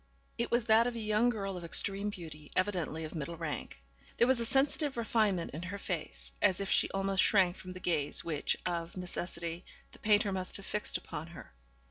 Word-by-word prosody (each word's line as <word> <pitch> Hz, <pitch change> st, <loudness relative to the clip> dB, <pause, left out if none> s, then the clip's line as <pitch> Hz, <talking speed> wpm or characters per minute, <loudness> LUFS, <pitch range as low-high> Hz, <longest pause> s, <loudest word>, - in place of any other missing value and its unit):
It 235 Hz, -, 0 dB
was 240 Hz, -2 st, +2 dB
that 225 Hz, +1 st, +5 dB
of 245 Hz, -, -2 dB
a -, -, -3 dB
young 215 Hz, +2 st, +3 dB
girl 195 Hz, -4 st, -2 dB
of 175 Hz, -, -7 dB
extreme 195 Hz, +4 st, 0 dB
beauty; 160 Hz, -6 st, -9 dB
evidently 180 Hz, -5 st, 0 dB
of 155 Hz, -, -6 dB
middle 165 Hz, +1 st, -4 dB
rank. 160 Hz, -3 st, -5 dB, 0.3 s
There 235 Hz, -, +5 dB
was 260 Hz, -2 st, +4 dB
a 230 Hz, -, 0 dB
sensitive 275 Hz, +1 st, +2 dB
refinement 215 Hz, -6 st, +1 dB
in 155 Hz, -, -5 dB
her 180 Hz, +3 st, -4 dB
face, 175 Hz, -5 st, -4 dB
as 190 Hz, -3 st, +4 dB
if 195 Hz, -, -2 dB
she -, -, +4 dB
almost 195 Hz, 0 st, +1 dB
shrank 185 Hz, -4 st, +4 dB
from 185 Hz, -, -10 dB
the 185 Hz, 0 st, -7 dB
gaze 155 Hz, -5 st, 0 dB
which, 155 Hz, -4 st, 0 dB
of 170 Hz, 0 st, -2 dB
necessity, 170 Hz, -1 st, -3 dB, 0.3 s
the -, -, -16 dB
painter 210 Hz, -1 st, +3 dB
must 185 Hz, -1 st, -1 dB
have 195 Hz, -, -10 dB
fixed 210 Hz, -, 0 dB
upon 150 Hz, +2 st, -7 dB
her. 170 Hz, -, -11 dB
190 Hz, 200 wpm, -32 LUFS, 170-215 Hz, 0.3 s, that